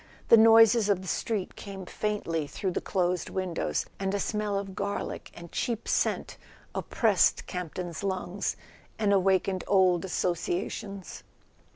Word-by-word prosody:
The - - +10
noises 225 -1 +7
of 190 -2 +1
the - - -9
street 205 +1 -2
came 195 -2 -8
faintly 170 -7 -2
through 190 +5 -3
the - - -2
closed 180 -2 -1
windows 185 -3 -2
and 195 0 -1
a - - 0
smell 210 -1 -1
of 195 -1 -4
garlic 200 +2 -4
and 170 -1 -11
cheap 230 -2 -2
scent - - 0 0.4
op¬ - - -5
pressed - - +3
Campton's 175 -1 -5
lungs 190 0 -2 0.4
and 210 -2 +2
awakened 190 -1 +2
old 185 -3 +4
associa¬ 180 -1 -1
tions. 195 -3 -7
190 Hz, 145 wpm, -28 LUFS, 180-205 Hz, 0.4 s, The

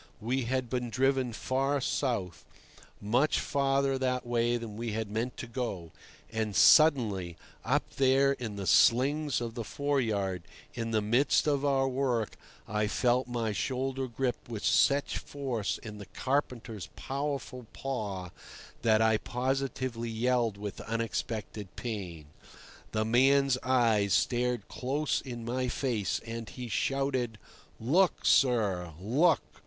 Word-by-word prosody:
We 125 +3 -1
had 130 +1 -1
been 125 0 -2
driven 130 +1 +1
far 135 +5 0
south—much 115 - -2
farther 135 -1 +1
that 125 -1 -1
way 120 0 +1
than 115 -3 -7
we 115 0 -4
had 110 -1 -3
meant 115 +4 -2
to - - -5
go; 115 -9 -4 0.4
and 110 -2 -2
suddenly, 110 - +5 0.3
up - - +1
there 135 +1 +4
in 120 -6 -4
the 100 -1 -5
slings 140 +7 +4
of 120 -1 -4
the 115 -1 -4
foreyard, 110 - -1 0.3
in 115 -2 -3
the 110 -2 +1
midst 120 +7 +3
of 145 -2 +1
our 135 -2 +2
work, 125 -4 -1 0.3
I 105 0 0
felt 125 +4 +1
my 120 -3 -1
shoulder 130 +4 -2
gripped 125 0 -3
with 110 -3 -5
such 140 0 +3
force 130 -7 -3
in 105 -2 -9
the 100 - -9
carpenter's 125 -6 -2
powerful 140 -3 -4
paw 100 -9 -4 0.5
that 110 -1 +4
I 110 -1 +4
positively 130 -1 -2
yelled 115 -1 +1
with 105 -1 -6
unexpected 110 -3 -4
pain. 95 -10 -5 0.7
The 110 0 0
man's 135 +3 +4
eyes 115 -6 +3
stared 125 -3 0
close 140 +4 -1
in 120 -3 -7
my 125 +2 -1
face, 120 -5 -1
and 115 -1 -6
he 125 -2 -7
shouted, 130 -1 -1 0.4
"Look, 165 +11 +2
sir! 100 - +3
look! 140 - +3
120 Hz, 130 wpm, -30 LUFS, 110-135 Hz, 0.7 s, suddenly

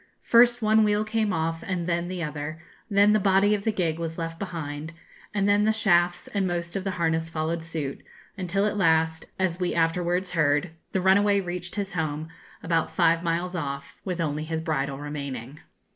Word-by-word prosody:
First 240 0 +5
one 215 +1 +5
wheel 210 0 +2
came 215 -1 0
off 165 -1 -1
and 180 -3 -3
then 170 0 -1
the 180 -1 -4
other; 150 +1 -5 0.3
then 205 +1 +5
the 215 - +4
body 195 +1 +4
of 205 -1 -2
the 220 - +3
gig 170 -6 -1
was 165 -1 -4
left 165 -1 -4
behind, 160 -4 -5 0.4
and 200 -1 +1
then 205 0 +4
the 220 - +4
shafts 175 -5 +2
and 195 -2 0
most 175 0 -3
of 195 - -2
the 195 - -1
harness 165 -1 0
followed 160 +1 -2
suit; 155 -4 -4 0.3
until 195 +1 0
at 210 0 -1
last 160 -3 +2
as 185 -2 0
we 180 -1 -1
afterwards 175 +2 +1
heard 150 -1 +2 0.2
the 190 - 0
runaway 200 +2 +4
reached 180 -1 -4
his 200 -3 -3
home, 155 -1 -2 0.3
about 165 -1 +1
five 165 0 +3
miles 175 +2 -1
off, 140 -4 -5
with 180 -3 -3
only 155 -2 -1
his 160 0 -3
bridle 140 -4 -2
remaining. 140 -2 -6
170 Hz, 190 wpm, -26 LUFS, 160-195 Hz, 0.4 s, First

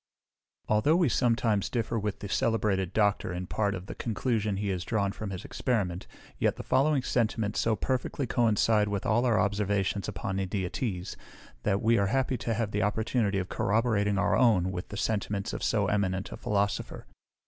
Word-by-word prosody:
Although 110 +9 +3
we 170 -5 +3
sometimes 115 -4 +1
differ 115 -1 -1
with 105 -1 -3
the 100 - -4
celebrated 100 -3 0
Doctor 105 -3 +1
in 90 +1 -4
part 100 +2 -1
of 95 0 -7
the - - -7
conclusion 110 -3 -1
he 100 0 -2
has 90 -2 -2
drawn 100 -4 0
from 110 0 -6
his 95 -2 -6
experiment, 95 -8 -2 0.3
yet - - +2
the - - -7
following 135 +1 +2
sentiments 110 -4 0
so 110 -1 +2
perfectly 130 +3 -2
coincide 110 -2 +2
with 100 -1 -3
all 120 +4 +2
our 110 -4 +3
observations 100 0 0
upon 95 -1 -3
India 95 -1 -2
teas, 95 -8 -3 0.5
that 100 +6 0
we 115 0 +4
are 100 - +2
happy 130 +3 0
to 115 - -1
have 110 -2 -1
the 105 - 0
opportunity 105 0 0
of 95 -1 -2
corroborating 105 -2 +1
our 100 0 +2
own 105 -6 +3
with 90 0 -5
the 105 - -7
sentiments 100 -2 -1
of - - -4
so - - +2
eminent 95 -2 -1
a - - -5
Philosopher. 100 -1 -2
105 Hz, 180 wpm, -29 LUFS, 100-115 Hz, 0.5 s, we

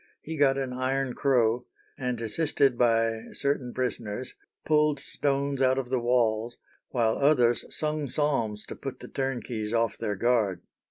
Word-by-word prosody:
He 160 - -5
got 140 -2 +3
an 135 -2 -2
iron 130 0 -1
crow, 120 -4 +2 0.3
and 125 -3 -3
assisted 135 +2 +1
by 115 -1 +2
certain 140 -3 -1
prisoners, 125 -2 -3 0.3
pulled 150 -2 +3
stones 140 -1 -1
out 130 0 +4
of 130 -2 -3
the 130 - +2
walls, 120 -1 +1 0.3
while 115 -3 +1
others 125 -5 +4
sung 150 -2 -2
psalms 120 -8 0
to - - -7
put 135 -2 -7
the - - -9
turnkeys 120 -5 -3
off 115 -2 +1
their 105 -3 -2
guard. 110 -3 +1
125 Hz, 150 wpm, -27 LUFS, 115-140 Hz, 0.3 s, out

